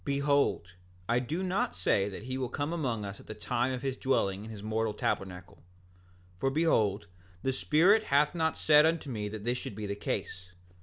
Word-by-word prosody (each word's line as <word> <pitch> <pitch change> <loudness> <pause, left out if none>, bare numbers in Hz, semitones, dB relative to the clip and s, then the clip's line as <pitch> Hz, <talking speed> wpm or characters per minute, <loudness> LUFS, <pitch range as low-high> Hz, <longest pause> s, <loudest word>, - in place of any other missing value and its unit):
7:8 - - -28
Behold, 140 - +1 0.3
I 120 +1 +2
do 155 +9 -3
not 185 - -1
say 95 +2 +1
that 100 +1 -8
he 130 +2 -4
will 130 -2 -2
come 145 +6 -2
among 125 -10 -2
us 100 0 -7
at - - -15
the 110 - -6
time 120 +4 -1
of 130 0 -4
his 135 -1 -2
dwelling 100 -7 0
in 110 - -9
his 105 -2 -8
mortal 110 0 -1
tabernacle; 90 -1 -3 0.8
for 135 - +1
behold, 110 -10 +2 0.4
the 130 - +1
Spirit 185 +11 +4
hath 145 +2 +3
not 160 -2 0
said 150 -1 +6
unto 160 -3 0
me 105 -3 -3
that 105 0 -7
this 120 +1 0
should 105 - -6
be 105 0 -5
the 100 - -2
case. 95 -2 -4
120 Hz, 205 wpm, -30 LUFS, 105-145 Hz, 0.8 s, said